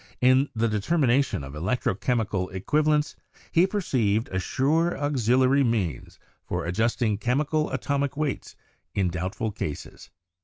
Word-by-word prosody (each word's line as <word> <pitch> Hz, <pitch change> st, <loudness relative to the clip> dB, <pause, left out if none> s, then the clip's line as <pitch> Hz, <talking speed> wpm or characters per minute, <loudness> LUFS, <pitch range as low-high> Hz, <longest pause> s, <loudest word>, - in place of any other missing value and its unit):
In 130 Hz, +3 st, +4 dB
the 115 Hz, +1 st, +1 dB
determination 130 Hz, -, +1 dB
of 70 Hz, +1 st, -8 dB
electro 95 Hz, +10 st, -1 dB
chemical 105 Hz, -4 st, -1 dB
equivalents 150 Hz, -, +1 dB, 0.4 s
he 175 Hz, +3 st, +4 dB
perceived 120 Hz, -, 0 dB
a 95 Hz, -, -2 dB
sure 155 Hz, -, +1 dB
auxiliary 130 Hz, -1 st, +2 dB
means 100 Hz, -, -2 dB, 0.3 s
for -, -, -3 dB
ad 85 Hz, -, -2 dB
justing 110 Hz, 0 st, 0 dB
chemical 150 Hz, +5 st, 0 dB
atomic 140 Hz, -1 st, -2 dB
weights 150 Hz, -3 st, -3 dB, 0.4 s
in 95 Hz, -2 st, +1 dB
doubtful 90 Hz, +5 st, -3 dB
cases. 75 Hz, -8 st, -6 dB
125 Hz, 125 wpm, -26 LUFS, 100-140 Hz, 0.4 s, In